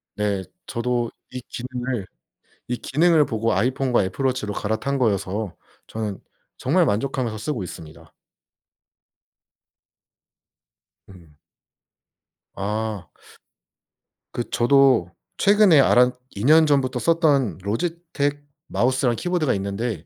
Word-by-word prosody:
네. 100 -2 -1 0.2
저도 120 -1 -2 0.2
이 125 0 -7
기능을, 125 -4 -4 0.6
이 125 0 -2
기능을 155 +4 +3
보고 115 +1 -1
아이폰과 125 +2 +1
애플 95 +9 -3
워치로 125 -6 -1
갈아탄 110 +8 -2
거여서 100 -3 -1 0.3
저는 105 -3 -4 0.4
정말 165 +6 +2
만족하면서 120 -1 -1
쓰고 115 -3 -3
있습니다. 80 -1 -11 3.0
음. 85 -6 -17 1.2
아. 105 -2 -3 1.3
그 120 - -4
저도 125 -6 +4 0.3
최근에 200 -6 +5
알았 125 -1 +5 0.2
2 100 - -5
년 160 +2 +6
전부터 130 -3 +1
썼던 145 - +2
로지텍 145 - -2 0.2
마우스랑 125 -1 +1
키보드가 175 -1 0
있는데 100 -2 -3
120 Hz, 220 characters per minute, -23 LUFS, 105-140 Hz, 3.0 s, 년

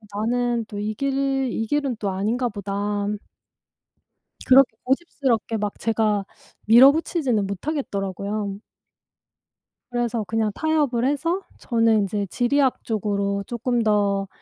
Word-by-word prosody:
나는 235 +2 0
또 210 -1 -8
이 210 +1 -3
길 275 +4 -1 0.4
이 225 0 -2
길은 275 -3 -1
또 200 - -1
아닌가 225 +6 -1
보다.' 205 0 -3 1.4
그렇게 260 -3 +6
고집스럽게 260 -5 0
막 210 -1 -3
제가 215 -3 +1 0.4
밀어붙이지는 260 - +5
못하겠더라고요. 200 - -3 1.3
그래서 240 -2 -1
그냥 220 +1 0
타협을 295 -7 +1
해서 330 +7 0 0.2
저는 230 -2 +2
인제 200 0 -1
지리학 255 +6 +1
쪽으로 200 -2 -1
쪼끔 240 0 -1
더 200 -2 +1
225 Hz, 255 characters per minute, -23 LUFS, 205-255 Hz, 1.4 s, 그렇게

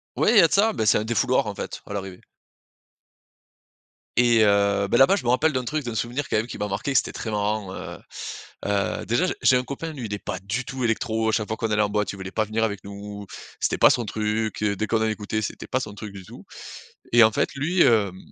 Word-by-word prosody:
Oui, - - +2
il 230 - +5
y - - +10
a 165 - +6
de - - -5
ça. 215 +3 +4
Bah, 110 - -1
c'est - - +5
un - - -2
défouloir, 115 +1 +1
en - - -3
fait, - - -6
à 105 - -6
l'arrivée. 95 -2 -6 2.0
Et 120 -2 +5
heu, 100 -1 +3
bah, 120 - +3
là-bas 135 +10 +6
je - - -4
me 120 - -1
rappelle 150 +6 +3
d'un 130 -1 -1
truc, 150 +4 -2
d'un 120 -2 -4
souvenir, 120 +5 -2
quand - - +1
même, 110 - 0
qui 120 - -8
m'a 105 - -1
marqué, 105 +7 -3
que 135 - +3
c'était - - +1
très 110 - -5
marrant 105 -2 -1
heu - - -7 0.7
heu, 100 -1 -1
déjà 120 +11 +2
je 185 - -1
j'ai 130 - +5
un 125 - -1
copain, 140 +5 -5
lui, 135 -6 -6
il 100 - -5
est 100 - -3
pas 95 - -4
du 100 +6 -3
tout 135 -3 -5
électro. 110 -1 0
À - - +2
chaque 110 -1 0
fois 110 - -3
qu'on 115 -1 -2
allait 105 0 +3
en 105 - +1
boîte, 105 -1 -1
il - - -7
voulait 95 -1 -7
pas 110 - 0
venir 110 +2 -1
avec 105 -3 -2
nous. 100 +1 -8 0.3
C'était - - 0
pas - - +8
son 120 - +1
truc, 110 +1 -2
heu, 105 -1 +1
dès 110 - -1
qu'on 110 +1 0
en 110 - +2
écoutait, 110 0 -3
c'était 105 - -5
pas 130 - 0
son 105 -5 -6
truc 105 -1 -8
du 95 -1 -9
tout - - -13 0.7
et 120 0 +7
en 110 - +5
fait - - 0
lui, 170 +6 +1
hem, 105 -7 +3
110 Hz, 265 wpm, -24 LUFS, 100-125 Hz, 2.0 s, y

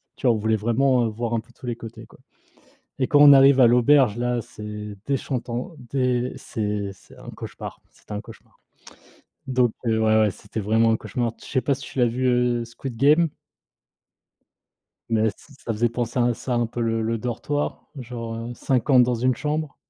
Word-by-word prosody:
tu - - -2
vois 120 - +4
on 110 - -2
voulait 110 +1 +1
vraiment, 120 +4 +2
heu, - - -2
voir 115 +1 -3
un 115 - 0
peu 120 - -23
tous - - -13
les 120 - -2
côtés 115 -1 -10
quoi - - -20 0.8
et 130 - +2
quand 145 - +4
on 145 -1 +10
arrive 135 0 +7
à 125 - +8
l'auberge 125 -1 +4
là 120 0 0
c'est 105 -1 -8
déchantant, 130 +2 -3
des 125 0 -1
c'est 105 -2 -3
c'est 95 - -19
un - - -9
cauchemar, - - -9
c'est - - -27
un 105 - -3
cauchemar. 115 -1 -16 0.9
Donc 125 -3 +2
heu, 110 -1 +2
ouais, 110 0 +4
ouais 105 - +3
c'était 105 +4 -7
vraiment 110 +2 +2
un - - +2
cauchemar. 115 +2 -3
Je - - -13
sais 130 - 0
pas 140 - +1
si 135 - -11
tu - - -9
l'as 120 - +4
vu, 125 +3 -1
heu, 125 -1 +2
Squid 120 +1 -8
Game? 150 +6 +4 1.8
Mais 110 -1 +2
ç - - -18 0.3
ça 115 - -1
faisait 115 +2 +1
penser 120 +1 -3
à 120 0 +3
ça 125 +1 -4
un 120 0 +1
peu 115 +1 -6
le 115 -1 0
le 115 +1 -1
dortoir, 125 +6 -3
genre, 115 -2 -6
heu, 115 +1 -6
50 130 +1 +3
dans 125 0 +1
une 125 +2 +1
chambre. 150 +1 -3
120 Hz, 200 wpm, -23 LUFS, 115-130 Hz, 1.8 s, on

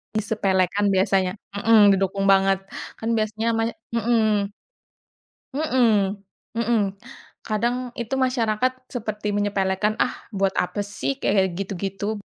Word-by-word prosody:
disepelekan 200 -2 +1
biasanya. 190 -1 +2 0.2
Mhm. 205 -1 +6
Didukung 195 +1 0
banget, 195 0 +4 0.4
kan 225 - -3
biasanya 220 +1 -1
mas 225 +1 0 0.2
mhm. 220 -3 +2 1.1
Mhm, 225 -9 +2 0.4
mhm. 235 0 +2 0.7
Kadang, 240 +3 -1
itu 240 +3 -3
masyarakat 255 -2 +1 0.2
seperti 210 -4 -3
menyepelekan, 205 0 0
ah - - -6
buat 195 0 +2
apa 180 +3 -1
sih? 205 +7 -3
Kayak 190 -8 +1
gitu-gitu. 195 +2 -3
210 Hz, 105 wpm, -23 LUFS, 195-225 Hz, 1.1 s, Mhm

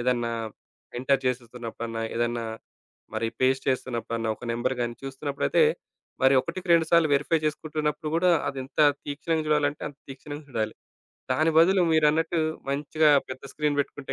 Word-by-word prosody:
ఏదన్నా 120 -1 0 0.7
ఎంటర్ 135 +1 +1
జేసేస్తున్నప్పుడన్నా, 115 -2 -4
ఏదన్నా 120 0 -1 0.7
మరి 115 - 0
పేస్ట్ 130 +1 +2
చేస్తున్నప్పుడన్నా, 115 -3 -2
ఒక - - -11
నంబర్ 120 +3 -1
గాని 120 0 -2
చూస్తున్నప్పుడైతే 140 - 0 0.6
మరి 130 +1 +6
ఒకటికి 175 +6 -6
రెండు 165 -1 +4
సార్లు 170 -2 +5
వెరిఫై 165 +4 +2
చేసుకుంటున్నప్పుడు 150 0 -2
కూడా 180 +2 +4 0.2
అది 140 - -4
ఎంత 135 - -4 0.2
తీక్షణంగా 155 +2 -2
చూడాలంటే 150 -1 +1
అంత 145 -1 -15
తీక్షణంగా 145 +3 -8
చూడాలి. 110 -3 -2 0.6
దాని 155 +5 +2
బదులు 185 +3 +5
మీరన్నట్టు 160 +2 +3 0.3
మంచిగా 150 +2 +2 0.2
పెద్ద 130 0 -7
స్క్రీన్ 150 -1 0
పెట్టుకుంటే 140 -1 -5
140 Hz, 135 wpm, -26 LUFS, 125-155 Hz, 0.7 s, మరి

